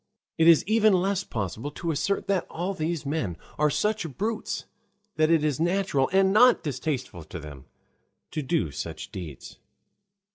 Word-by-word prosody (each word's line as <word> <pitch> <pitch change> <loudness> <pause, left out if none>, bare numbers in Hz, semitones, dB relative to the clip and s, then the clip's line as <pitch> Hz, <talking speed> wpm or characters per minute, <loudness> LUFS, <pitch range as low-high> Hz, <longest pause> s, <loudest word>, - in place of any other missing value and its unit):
It 165 - +5
is 165 -2 +7
even 220 0 +4
less 190 +1 +1
possible 110 - -4
to 165 +3 -3
assert 195 +7 -1
that 195 -3 0
all 180 +4 -3
these 160 -3 -3
men 140 - -2 0.2
are 150 0 +4
such 210 +2 0
brutes 220 +2 -2 0.5
that 155 0 +3
it 165 -2 +4
is 150 -3 0
natural 175 -5 +1
and 190 0 +4
not 245 +3 +6
distasteful 130 - -3
to 85 +2 -7
them 75 -3 -10 0.7
to 155 - -2
do 130 - 0
such - - -6
deeds. 80 -8 -8
160 Hz, 155 wpm, -26 LUFS, 130-195 Hz, 0.7 s, is